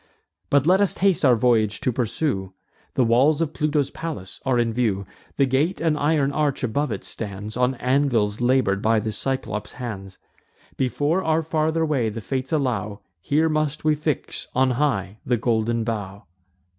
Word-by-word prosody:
But 140 -1 +3
let 185 +4 +4
us 200 - +2
haste 195 -3 +2
our 130 -4 +6
voyage 110 -4 +2
to 130 - +1
pursue: 115 -4 -2 0.4
The 130 - +3
walls 130 +7 +4
of 160 -2 -1
Pluto's 150 -3 0
palace 150 - -6
are 130 -2 +1
in 115 -1 +1
view; 110 -5 0 0.3
The 140 - +4
gate, 140 +8 0
and 160 -2 +1
iron 145 -1 +1
arch 145 -2 -1
above 140 +5 0
it, - - -4
stands 105 0 -6
On 125 +1 +1
anvils 125 -5 +1
labour'd 120 -6 +2
by 110 0 +3
the 110 0 -3
Cyclops' 130 -3 -3
hands. 95 -7 -7 0.6
Before 145 +7 0
our 160 0 +1
farther 160 +1 0
way 135 -8 0
the 110 +2 -6
Fates 130 +5 -4
allow, 110 -9 -1 0.2
Here 155 - +2
must 155 -1 -1
we 155 0 +3
fix 150 -2 -3
on 130 0 +3
high 110 -7 -1
the 125 - +1
golden 115 0 0
bough." 105 -3 -4
130 Hz, 170 wpm, -23 LUFS, 110-150 Hz, 0.6 s, our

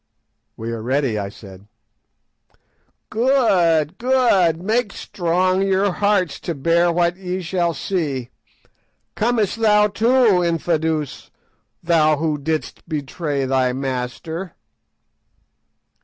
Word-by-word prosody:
_" - - -54 0.5
"We 115 +1 -5
are 115 -1 -4
ready," 130 -2 0
I 100 -1 -4
said. 100 -1 -14 1.4
"Good, 190 - +2
good! 235 -10 +3
Make 215 +3 -1
strong 185 +1 0
your 195 0 +2
hearts 200 -4 0
to 170 - -4
bear 170 +4 +2
what 170 +1 +1
ye 185 0 -4
shall 175 -1 -1
see. 145 -10 -3 0.8
Comest 225 -2 0
thou 210 -1 +4
too, 225 -2 +3
Infadoos, 160 -3 -1 0.5
thou 155 -3 +3
who 155 -1 -1
didst 155 +3 -4
betray 145 -1 -3
thy 130 -1 +1
master?" 135 +7 -4
170 Hz, 105 wpm, -20 LUFS, 145-195 Hz, 1.4 s, thou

